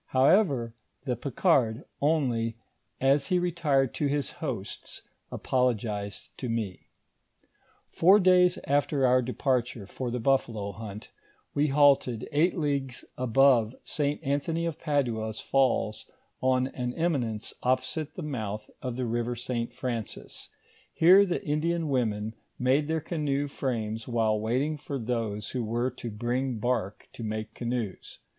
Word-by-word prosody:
However, 130 - +3 0.3
the 125 -3 0
Picard 135 -3 +1 0.2
only, 125 -7 +1 0.4
as 135 +1 +3
he 180 -2 +2
retired 160 -7 +1
to 145 - 0
his 145 0 -1
host's, 120 -11 -5 0.3
apologised 110 -5 -1
to 125 - -3
me. 110 -5 -3 1.0
Four 190 +5 +6
days 180 -1 +5
after 140 -1 +2
our 130 0 +5
departure 125 -3 -1
for 125 +5 -5
the 125 +1 -2
buffalo 115 -5 0
hunt, 105 0 -9 0.4
we 145 +1 +2
halted 135 -5 +3
eight 160 +6 +2
leagues 140 -5 -2
above 130 -2 +4
St. 145 -2 -1
Anthony 150 +4 -1
of 165 -2 -3
Padua's 115 -8 -1
falls 130 -5 +1 0.3
on 130 0 +3
an 125 -2 -4
eminence 130 -11 -1
opposite 140 +4 -1
the 180 - -5
mouth 110 -8 -4
of 125 -2 -3
the 130 0 -2
river 120 +1 -1
St. 120 0 -3
Francis; 115 -4 -5 0.5
here 190 +5 +7
the 175 - -2
Indian 160 +2 0
women 110 -5 0 0.2
made 135 +4 +2
their 160 0 0
canoe 145 -3 -1
frames 115 -5 -3
while 110 -3 +1
wait 115 +5 +1
ing 155 +1 -2
for 140 -1 -4
those 115 -4 -3
who 125 -2 -2
were 120 +3 -1
to 120 -1 -7
bring 120 +3 -2
bark 110 -3 -2
to - - -9
make 110 0 -4
canoes. 120 -5 -4
130 Hz, 135 wpm, -28 LUFS, 115-145 Hz, 1.0 s, here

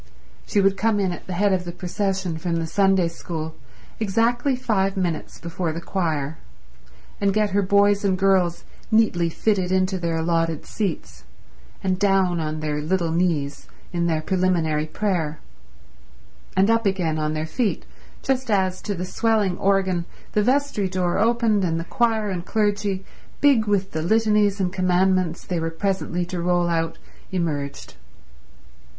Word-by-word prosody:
She - - +1
would 195 0 +3
come 215 +1 +2
in 190 -2 +1
at 175 - -8
the 185 - -4
head 200 +2 +2
of 185 -1 0
the 175 - -5
procession 185 -1 -2
from 170 0 -1
the 165 -1 -1
Sunday 190 +1 +3
School 160 -1 -5 0.5
exactly 235 +5 +1
five 195 -6 0
minutes 175 -4 -2
before 170 0 -3
the 165 - -4
choir, 160 -5 -2 0.8
and 200 0 +2
get 210 -1 +2
her 200 +2 +2
boys 200 +1 +3
and 190 -2 +2
girls 185 -3 +2 0.3
neatly 215 -7 +3
fitted 190 0 0
into 185 0 +1
their 170 -1 -1
allotted 165 -1 0
seats, 205 -4 -4 0.6
and 185 -1 0
down 190 -3 +2
on 155 -1 -3
their 150 -1 -2
little 170 +1 0
knees 160 -5 -1 0.3
in 170 0 0
their 160 -2 0
preliminary 170 -5 +1
prayer, 165 -4 -1 1.2
and 195 +4 +5
up 230 -2 +2
again 175 -5 0
on 155 0 -1
their 155 0 -2
feet 210 +7 -1 0.4
just 260 -2 0
as, 190 -3 +1
to 205 - -3
the 180 +1 -3
swelling 210 -1 +1
organ, 190 -3 +1 0.3
the 210 - +2
vestry 250 -4 +1
door 180 -2 0
opened, 225 -3 +2
and 165 -2 0
the - - -3
choir 220 -1 +1
and 180 -1 -4
clergy, 205 -3 0 0.3
big 265 -7 +4
with 195 -2 +1
the 160 - -2
litanies 210 +1 +2
and 185 -1 0
commandments 185 -2 +1
they 175 -2 -2
were 165 0 -1
presently 180 0 -1
to 175 0 -4
roll 175 0 +2
out, 165 -1 -1 0.3
emerged. 150 -6 -3
185 Hz, 155 wpm, -23 LUFS, 170-205 Hz, 1.2 s, and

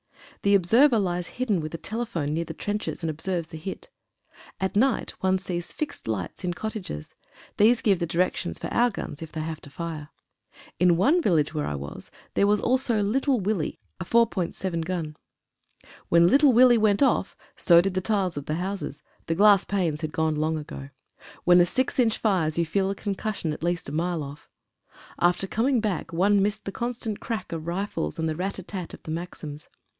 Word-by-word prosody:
The 200 0 +4
observer 230 +8 +5
lies 180 -4 -1
hidden 220 -9 +1
with 155 +1 -5
a - - -3
telephone 200 -9 -3
near 165 +2 0
the - - -7
trenches 210 -3 -3
and 165 - 0
observes 170 +1 -3
the 160 - -8
hit. 190 +4 -7 0.7
At 190 0 -2
night 250 +3 +2
one 190 0 +3
sees 180 -2 -4
fixed 295 - -5
lights 100 - -3
in 175 -1 -2
cottages. 200 - -6 0.4
These 225 +3 +4
give 195 -5 +3
the 170 - -1
directions 170 - -1
for - - -7
our 245 +1 +4
guns, 165 -8 -7
if 160 - -7
they 160 - -4
have 160 0 -5
to 145 - -11
fire. 155 -1 -6 0.7
In 175 -1 +4
one 295 - +4
village 160 - +2
where 150 -2 -2
I 75 - -2
was, 70 0 -8 0.2
there 200 - +3
was 210 0 +3
also 245 -4 +2
"Little 260 +5 +1
Willie" 195 -4 -2
— - - -50
a - - -3
4.7in. 185 -5 0
gun. 160 -3 -3 0.9
When 170 0 +6
"Little 275 - +6
Willie" 240 0 +6
went 215 +3 +3
off, 270 - +1 0.2
so 170 -1 +6
did 190 +2 +1
the 185 - 0
tiles 195 -3 0
of 145 - -5
the 155 - -1
houses 185 -4 -4
— - - -36
the 165 - 0
glass 200 +1 +6
panes 170 -6 -1
had 155 -2 -3
gone 160 0 0
long 155 +1 0
ago. 70 - -8 0.5
When 175 0 +6
a - - +5
6 260 +7 -1
inch 225 -3 +3
fires 175 -8 +1
you 170 - +2
feel 190 +4 0
the 200 - -2
concussion 200 -5 -3
at - - -8
least 175 0 -1
a - - -6
mile 165 +1 -1
off. 140 +1 -10 0.7
After 175 +2 +2
coming 240 +6 +1
back 210 -5 -2
one 195 +4 +3
missed 205 +1 -1
the 195 - -3
constant 235 -1 -3
crack 225 -5 -4
of 165 -1 -5
rifles 175 - -2
and 160 - -1
the 155 - -1
rat 190 +4 -3
a 190 - -7
tat 185 -2 -6
of - - -19
the 155 - -6
maxims. 160 -3 -6
180 Hz, 200 wpm, -26 LUFS, 160-210 Hz, 0.9 s, When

